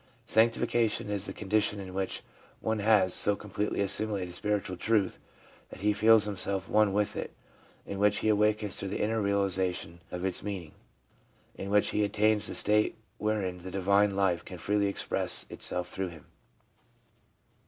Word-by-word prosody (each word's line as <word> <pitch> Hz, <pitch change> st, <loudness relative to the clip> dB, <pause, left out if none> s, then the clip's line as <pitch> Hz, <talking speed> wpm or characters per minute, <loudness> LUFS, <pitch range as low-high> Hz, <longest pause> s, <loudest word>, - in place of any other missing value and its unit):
Sanctification 115 Hz, -1 st, +1 dB
is 100 Hz, 0 st, +1 dB
the -, -, -4 dB
con 105 Hz, -, -9 dB
dition 105 Hz, 0 st, +2 dB
in 95 Hz, -2 st, -8 dB
which 95 Hz, 0 st, -3 dB, 0.4 s
one 110 Hz, -1 st, -1 dB
has 100 Hz, -3 st, +3 dB
so 105 Hz, -, +2 dB
completely 105 Hz, 0 st, -3 dB
assimilated 100 Hz, -2 st, 0 dB
spiritual 100 Hz, 0 st, -2 dB
truth 105 Hz, +1 st, 0 dB, 0.5 s
that -, -, -11 dB
he 105 Hz, +1 st, +2 dB
feels 110 Hz, +1 st, +5 dB
himself 100 Hz, -2 st, -2 dB
one 105 Hz, -1 st, +3 dB
with 105 Hz, +1 st, 0 dB
it; -, -, -6 dB, 0.5 s
in 100 Hz, -, -6 dB
which 105 Hz, 0 st, +3 dB
he -, -, +3 dB
awakens 105 Hz, -1 st, +2 dB
to 100 Hz, -, +1 dB
the 95 Hz, -, -4 dB
inner 110 Hz, +1 st, 0 dB
realisation 95 Hz, -4 st, 0 dB
of 90 Hz, +1 st, -4 dB
its 95 Hz, -2 st, 0 dB
mean 100 Hz, -4 st, -4 dB
ing; 80 Hz, -, -15 dB, 0.9 s
in -, -, -6 dB
which 105 Hz, 0 st, +3 dB
he 105 Hz, -, 0 dB
attains 105 Hz, +1 st, +2 dB
that -, -, -4 dB
state 105 Hz, +1 st, +3 dB, 0.2 s
wherein 105 Hz, -4 st, -1 dB
the 95 Hz, -, -8 dB
divine 100 Hz, +1 st, +2 dB
life 95 Hz, -3 st, +1 dB
can 90 Hz, -, -9 dB
freely 100 Hz, +3 st, 0 dB
express 100 Hz, -, 0 dB
itself 90 Hz, 0 st, -1 dB
through 95 Hz, +1 st, -4 dB
him. 80 Hz, -3 st, -13 dB
100 Hz, 165 wpm, -29 LUFS, 95-105 Hz, 0.9 s, feels